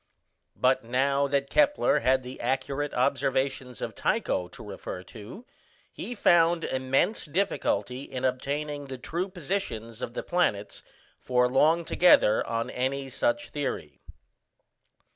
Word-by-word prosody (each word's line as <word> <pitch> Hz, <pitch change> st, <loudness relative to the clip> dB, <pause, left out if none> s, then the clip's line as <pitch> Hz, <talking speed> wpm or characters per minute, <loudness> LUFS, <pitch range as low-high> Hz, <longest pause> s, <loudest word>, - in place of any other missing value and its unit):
But 130 Hz, -1 st, +2 dB
now 135 Hz, +4 st, +1 dB
that 140 Hz, 0 st, -1 dB
Kepler 295 Hz, -1 st, +3 dB
had 130 Hz, 0 st, +2 dB
the 125 Hz, +1 st, -8 dB
accurate 135 Hz, +3 st, -1 dB
observations 130 Hz, -1 st, 0 dB
of -, -, -4 dB
Tycho 90 Hz, -, 0 dB
to -, -, -12 dB
refer 95 Hz, -2 st, -7 dB
to, 115 Hz, -, -11 dB, 0.5 s
he 245 Hz, -, -6 dB
found 170 Hz, -4 st, +4 dB
immense 130 Hz, +11 st, 0 dB
difficulty 140 Hz, -, -1 dB
in 130 Hz, -2 st, -4 dB
obtaining 145 Hz, +3 st, -2 dB
the 130 Hz, -1 st, -6 dB
true 170 Hz, +9 st, -3 dB
positions 140 Hz, -, -4 dB
of 120 Hz, -, -5 dB
the -, -, -3 dB
planets 105 Hz, -, 0 dB, 0.4 s
for 125 Hz, -1 st, +2 dB
long 155 Hz, +6 st, +3 dB
together 160 Hz, -13 st, +5 dB
on 115 Hz, 0 st, -2 dB
any 135 Hz, +1 st, -2 dB
such 295 Hz, -, 0 dB
theory. 105 Hz, -, -4 dB
135 Hz, 125 wpm, -27 LUFS, 125-160 Hz, 0.5 s, together